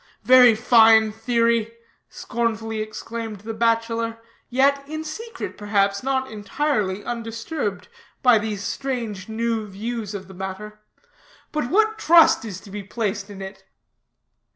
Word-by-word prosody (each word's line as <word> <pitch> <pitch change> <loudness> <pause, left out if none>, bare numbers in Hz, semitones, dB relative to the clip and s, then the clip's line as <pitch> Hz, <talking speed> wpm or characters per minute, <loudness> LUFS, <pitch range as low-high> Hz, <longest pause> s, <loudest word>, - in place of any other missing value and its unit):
'" - - -44
"Very 250 0 +7
fine 225 -2 +5
theory," 230 0 +1 0.4
scornfully 225 -2 -3
exclaimed 215 -1 -6
the 225 +2 -6
bachelor, 230 0 0 0.3
yet 275 +2 +2
in 310 0 -4
secret, 450 +10 -7
perhaps, 200 -1 +1
not 265 -1 -1
entirely 210 -2 -1
undisturbed 230 0 -4 0.4
by 245 -4 +6
these 210 -2 -4
strange 230 -7 -4
new 225 -1 -2
views 210 +1 -5
of 190 -2 -7
the 190 - -12
matter; 190 +3 -7 0.7
"but 300 -5 -2
what 435 +3 +2
trust 335 - +6
is 200 -5 -6
to 200 - -14
be 205 +1 -5
placed 200 0 -3
in 195 -1 -8
it?" 190 +1 -10
225 Hz, 130 wpm, -23 LUFS, 210-245 Hz, 0.7 s, Very